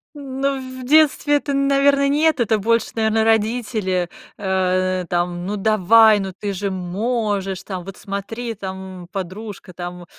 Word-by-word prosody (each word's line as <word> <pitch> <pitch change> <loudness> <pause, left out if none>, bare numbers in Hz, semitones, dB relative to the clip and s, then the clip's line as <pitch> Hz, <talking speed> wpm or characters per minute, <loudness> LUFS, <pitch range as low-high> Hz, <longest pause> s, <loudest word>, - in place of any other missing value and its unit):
Ну, 275 -1 -2 0.2
в - - -7
детстве 295 +1 +4
это, 285 0 -1
наверное, 275 0 +3
нет, 310 +1 +2
это 225 -2 +2
больше, 230 +3 +1
наверное, 220 0 +2
родители, 215 -5 0 0.3
э, 185 -1 0
там: 175 0 -1
"Ну, 205 +2 -2
давай, 215 +1 +5
ну, 190 -1 -4
ты 205 - -2
же 195 +1 -3
можешь, 195 0 -2
там, 185 -2 -6
вот 195 0 -8
смотри, 225 +4 -5
там, 190 -2 -7
м, - - -13
подружка, 195 0 -7
там, 175 0 -7
205 Hz, 145 wpm, -21 LUFS, 185-240 Hz, 0.3 s, давай